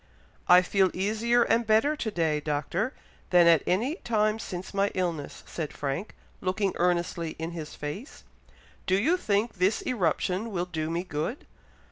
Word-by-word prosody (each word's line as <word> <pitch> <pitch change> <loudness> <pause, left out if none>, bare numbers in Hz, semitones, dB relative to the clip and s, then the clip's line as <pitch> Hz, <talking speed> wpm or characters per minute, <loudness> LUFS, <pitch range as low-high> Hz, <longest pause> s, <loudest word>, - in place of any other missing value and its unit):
"I 180 +1 +8
feel 190 +1 +3
easier 220 +5 +2
and 230 0 +1
better 225 +8 +3
to 240 -7 -3
day, 160 -6 0
Doctor, 150 - -1 0.4
than 175 -1 +6
at 165 -3 +6
any 240 - +1
time 215 - +1
since 185 -2 -6
my 200 0 +2
illness," 170 -6 -3
said 160 -3 -5
Frank, 145 +9 -4 0.3
looking 190 +1 0
earnestly 175 -2 0
in 160 +1 -4
his 160 -3 -7
face. 150 - -7 0.6
"Do 185 - +3
you 320 - +3
think 215 - 0
this 190 +4 +2
eruption 190 -1 0
will 175 -2 -1
do 160 -3 -3
me 170 +2 -1
good? 165 - -4
185 Hz, 155 wpm, -27 LUFS, 165-220 Hz, 0.6 s, I